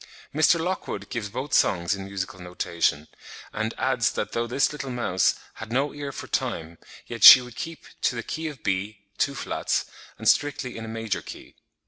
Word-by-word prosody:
Mr. 155 +3 +4
Lockwood 160 - -4
gives 110 -3 -3
both 130 +6 -5
songs 85 -1 +3
in 95 -1 -5
musical 95 -1 -5
notation; 85 -4 -1 0.5
and 110 +1 -2
adds 125 -5 +1
that 105 - -3
though 115 0 -1
this 130 +4 +1
little 145 -2 -6
mouse 100 -7 +1 0.2
"had 110 0 -9
no 135 +4 0
ear 145 -1 -5
for - - -7
time, 85 0 -3 0.3
yet 115 -1 -6
she - - +13
would 125 -2 -10
keep 165 -1 -6 0.2
to - - +1
the 115 - -4
key 160 +6 -4
of 145 -6 -8
B 100 +2 -2 0.2
(two 140 - +1
flats) - - -1 0.3
and - - -4
strictly 145 -3 +2
in 115 - -6
a - - -8
major 110 -5 -3
key."..." - - -11
115 Hz, 185 wpm, -25 LUFS, 100-140 Hz, 0.5 s, she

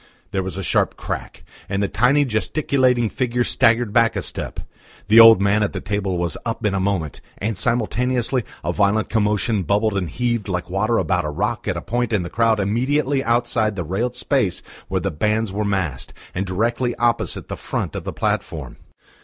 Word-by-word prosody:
There 95 - 0
was 95 0 -5
a 95 - -3
sharp 85 - +1
crack, - - -6 0.3
and 100 +1 0
the - - +1
tiny 130 +8 +3
gesticulating 125 0 +1
figure 120 +1 -1
staggered 115 -2 +2
back 115 -1 +3
a 100 - -2
step. - - -5 0.5
The 110 +2 +8
old 115 -3 +10
man 100 +2 +2
at 105 - 0
the - - -3
table 100 -3 -2
was 85 -3 -1
up 115 -2 -3
in 105 - +1
a 100 - 0
moment, 95 -6 -2 0.2
and 110 +2 -2
simultaneously 125 +3 0 0.2
a 85 +3 -1
violent 105 +2 +1
commotion 105 -1 +1
bubbled 100 +3 +1
and 90 -4 -1
heaved 120 -4 -1
like 90 -2 -3
water 105 +5 +1
about 90 -1 +1
a 75 - -2
rock 75 - -2
at - - -1
a - - -4
point 120 0 -2
in 100 -4 +1
the 85 - -7
crowd 115 -2 +2
immediately 135 +7 +1
outside 115 -2 +1
the 90 - -3
railed 110 +10 -2
space 125 -6 0 0.2
where - - -1
the - - -1
bands 105 +6 0
were 105 +1 -1
massed, 95 -10 -2 0.2
and 95 +2 -2
directly 120 +6 0
opposite 120 -1 0
the - - -5
front - - -4
of - - -4
the - - -4
platform. - - -3
110 Hz, 195 wpm, -21 LUFS, 95-120 Hz, 0.5 s, old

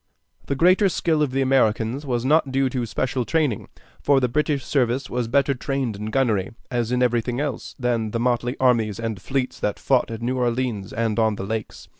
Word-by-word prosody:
The 140 - -1
greater 185 +6 +4
skill 160 -3 0
of 150 - +2
the 135 +1 0
Americans 130 +1 +1
was 120 -1 -1
not 145 -1 +3
due 135 0 +2
to 125 -2 -2
special 130 +2 -1
training; 145 -5 0 0.3
for 140 -1 +4
the 125 - +1
British 145 +2 0
service 130 -1 0
was 125 -1 -1
better 140 +3 +2
trained 130 -3 -2
in 105 +1 -5
gunnery, 115 -3 0 0.2
as 120 -2 -1
in 125 0 +2
everything 120 0 0
else, 145 -5 -4
than 120 -4 0
the 115 - -2
motley 120 +1 0
armies 115 -5 +2
and 110 -4 -4
fleets 130 +3 -2
that 105 - -1
fought 130 -2 +1
at 115 0 -6
New 130 +2 -1
Orleans 120 -5 -1
and 115 0 -1
on 110 -1 +2
the 95 - -5
Lakes. 110 +1 -5
125 Hz, 200 wpm, -23 LUFS, 115-135 Hz, 0.3 s, greater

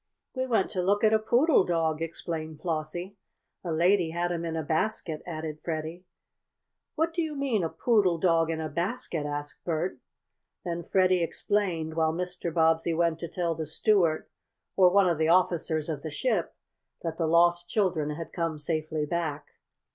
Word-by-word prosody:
"We 260 0 -2
went 225 -6 +1
to 185 - -1
look 200 +4 +1
at 215 0 +5
a 220 - +5
poodle 240 - +4
dog," 165 -3 0
explained 160 -1 -5
Flossie. 175 +4 -4 0.5
"A 175 - -3
lady 175 +2 +3
had 175 +2 -1
him 170 -1 -2
in 165 -1 -3
a 160 - -2
basket," 160 0 -1
added 155 -2 -5
Freddie. 165 +2 -4 0.9
"What 325 +1 0
do 340 - 0
you 315 -2 -3
mean 265 -9 0
a 165 - 0
poodle 185 0 +2
dog 165 -2 +2
in 160 -1 -2
a 160 - -2
basket?" 170 - -2
asked 145 0 -5
Bert. 170 +2 -2 0.7
Then 170 -1 -2
Freddie 185 0 +3
explained, 170 -2 -1
while 160 0 +1
Mr. 180 0 -3
Bobbsey 165 0 +2
went 165 -1 +1
to 170 - -4
tell 170 -1 -1
the 160 -1 -5
steward, 170 0 +2 0.5
or 185 -2 +6
one 195 +1 +4
of 170 -3 +1
the 160 - +2
officers 170 -3 +2
of 155 -4 -3
the 155 - -5
ship, 180 - -1 0.5
that 165 -1 -4
the 165 - +1
lost 175 +1 +3
children 175 -8 +1
had 165 +1 -7
come 165 -3 -2
safely 155 0 -2
back. 155 -2 -3
170 Hz, 175 wpm, -28 LUFS, 160-185 Hz, 0.9 s, or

